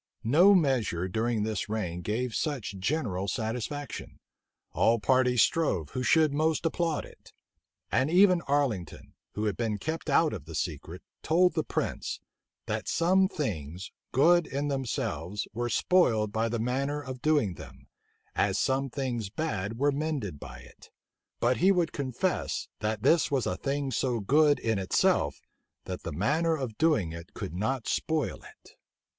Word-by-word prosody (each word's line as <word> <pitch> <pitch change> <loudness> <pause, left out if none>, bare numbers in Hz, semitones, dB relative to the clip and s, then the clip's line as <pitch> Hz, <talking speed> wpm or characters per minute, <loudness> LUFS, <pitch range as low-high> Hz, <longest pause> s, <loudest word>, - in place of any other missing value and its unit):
No 175 - +6
measure 120 - +1
during 110 +3 0
this 110 -1 -2
reign 90 -6 -3
gave 110 +6 -2
such 130 -5 -2
general 100 - -1
satisfaction. 120 +8 -4 0.5
All 115 - +3
parties 125 0 +3
strove 95 - 0
who 130 - -3
should 155 +4 +3
most 155 +2 +1
applaud 165 -1 0
it. - - -17 0.6
And 130 +3 +2
even 180 0 +5
Arlington, 135 - -1 0.2
who 105 - -1
had 105 - 0
been 110 -3 -1
kept 160 +9 -4
out 160 -2 +3
of 85 -9 -7
the 80 0 -8
secret, 80 +3 -4 0.2
told 180 +3 +3
the 160 -1 0
prince, - - -3 0.5
"that - - -3
some 190 +3 +3
things, 90 - -4 0.2
good 170 +5 +4
in 140 +2 -2
themselves, 110 - -3
were 120 +2 -2
spoiled 115 - +2
by 110 +2 0
the 120 - -1
manner 135 +5 -1
of 130 -3 -7
doing 145 - +2
them, - - -12 0.5
as 100 -1 +1
some 135 +3 0
things 120 -6 -3
bad 110 -5 -3
were 145 +3 +2
mended 140 - -3
by 60 -4 -9
it; - - -17 0.5
but 125 +1 +2
he 190 +3 +4
would 175 -4 +1
confess, 130 -4 -2
that 105 0 -2
this 160 +5 +4
was 135 -5 0
a 90 - -1
thing 140 +5 -2
so 125 -1 0
good 145 +7 +4
in 110 -3 -1
itself, 95 - +1 0.4
that - - -5
the - - -5
manner 155 - +1
of 130 -6 -4
doing 150 - +2
it 85 +1 -10
could - - -5
not 115 +6 -2
spoil 160 -2 -1
it." - - -16
125 Hz, 155 wpm, -28 LUFS, 105-150 Hz, 0.6 s, No